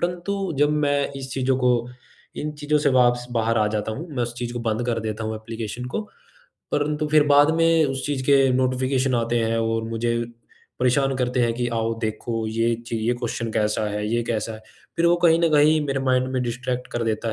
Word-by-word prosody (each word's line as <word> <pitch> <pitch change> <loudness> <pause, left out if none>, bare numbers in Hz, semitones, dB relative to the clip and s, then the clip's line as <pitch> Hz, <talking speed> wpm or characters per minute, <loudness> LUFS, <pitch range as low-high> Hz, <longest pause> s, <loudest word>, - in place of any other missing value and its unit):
परंतु 180 +1 -2
जब 145 0 +4
मैं 145 -2 +1
इस 135 -1 -7
चीज़ों 130 -1 +1
को 125 -1 +3 0.7
इन 150 0 -3
चीज़ों 150 +1 +1
से 150 - +2
वापस 120 0 +3
बाहर 115 -1 +1
आ 105 - +3
जाता 105 0 -2
हूँ, 155 +10 -6
मैं 125 - 0
उस 120 0 -4
चीज़ 120 -1 -4
को 120 - -4
बंद 115 +1 -1
कर 115 -2 0
देता 110 0 -4
हूँ 110 0 -3
ऐप्लीकेशन 115 +2 -6
को। 210 - -3 0.6
परंतु 150 +1 0
फिर 155 0 +5
बाद 145 +1 +6
में 165 -1 +4
उस 135 -1 -3
चीज 140 -3 -2
के 140 - +5 0.2
नोटिफ़िकेशन 130 0 +1
आते 115 0 +1
हैं 115 +1 0
और 115 0 0
मुझे 115 +1 -1 0.6
परेशान 135 +2 +2
करते 125 0 0
हैं 115 -1 +2
कि 120 0 -1
आओ 115 0 0
देखो 110 0 -3
ये 115 +1 +1
च - - -11
ये 115 +2 0
क्वेश्चन 115 -1 -4
कैसा 105 0 0
है, 105 0 -3
ये 120 0 +1
कैसा 110 -1 -2
है। 110 - -12 0.3
फिर 170 +1 +3
वो 175 +1 +4
कहीं 165 -1 +6
न 165 - +3
कहीं 150 +1 +5
मेरे 135 -1 -1
माइंड 130 0 +2
में 130 -1 0
डिस्ट्रैक्ट 125 +1 -3
कर 120 - -1
देता 110 0 -1
125 Hz, 215 wpm, -23 LUFS, 115-145 Hz, 0.7 s, बाद